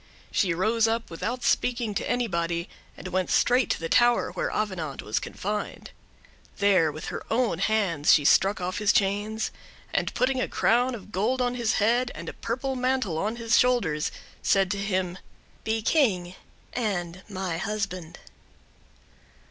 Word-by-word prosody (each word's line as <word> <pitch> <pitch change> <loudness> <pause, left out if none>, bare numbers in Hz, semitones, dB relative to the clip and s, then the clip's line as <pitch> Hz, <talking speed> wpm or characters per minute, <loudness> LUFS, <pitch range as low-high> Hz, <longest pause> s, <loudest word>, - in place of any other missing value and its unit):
She 185 - +2
rose 220 +6 +2
up, 225 -2 -2
without 240 +9 -3
speaking 235 -3 +1
to 200 - -3
anybody, 170 -7 -1 0.3
and 185 - -7
went 185 0 -1
straight 250 -2 +3
to - - 0
the 165 - -3
tower 240 +5 +3
where - - -2
Avenant 180 -9 -3
was 105 - -1
confined. 210 +2 -5 0.7
There, 190 -6 +4
with 155 +1 -7
her - - -5
own 225 -7 +1
hands, 195 -8 +2
she 145 - +5
struck 195 +6 +4
off 180 +2 -3
his 210 -1 +4
chains, 205 +3 0 0.4
and - - 0
putting 255 0 +1
a - - 0
crown 245 +2 +2
of 210 -2 -11
gold 220 +7 0
on 245 -1 +1
his 235 -3 0
head, 240 +4 +2
and - - -8
a - - -5
purple 260 +3 -3
mantle 255 -10 0
on 215 +5 -1
his 230 -1 +2
shoulders, 195 -12 +2 0.3
said 195 -1 +2
to 200 - -2
him, 185 -2 -1 0.4
"Be 220 0 -1
King—and 185 - -1
my 185 -4 -3
husband. 195 -4 -4
205 Hz, 155 wpm, -26 LUFS, 180-235 Hz, 0.7 s, she